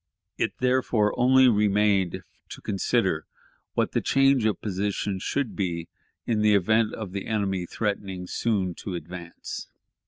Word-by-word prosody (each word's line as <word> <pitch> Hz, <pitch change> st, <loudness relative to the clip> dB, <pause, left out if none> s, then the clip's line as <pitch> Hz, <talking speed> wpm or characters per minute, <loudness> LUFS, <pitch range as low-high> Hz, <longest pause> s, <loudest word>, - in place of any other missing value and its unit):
It, -, -, -2 dB
therefore, 125 Hz, -4 st, +2 dB
only 130 Hz, +1 st, +5 dB
remained 105 Hz, -4 st, +2 dB, 0.3 s
to -, -, -9 dB
consider 95 Hz, -3 st, 0 dB, 0.5 s
what -, -, +1 dB
change 135 Hz, -3 st, +3 dB
of 105 Hz, -4 st, +1 dB
position 100 Hz, -1 st, -2 dB
should 140 Hz, +6 st, -2 dB
be 85 Hz, -4 st, -2 dB, 0.4 s
made 120 Hz, -, 0 dB
in -, -, +1 dB
the 105 Hz, -1 st, +5 dB
event 110 Hz, +3 st, +2 dB
of 110 Hz, -5 st, -6 dB
the 100 Hz, 0 st, -5 dB
enemy 95 Hz, -5 st, -1 dB
threatening 100 Hz, -4 st, -3 dB
soon 95 Hz, -3 st, -1 dB
to 95 Hz, -, -5 dB
advance. 85 Hz, +1 st, -7 dB
105 Hz, 135 wpm, -26 LUFS, 95-110 Hz, 0.5 s, only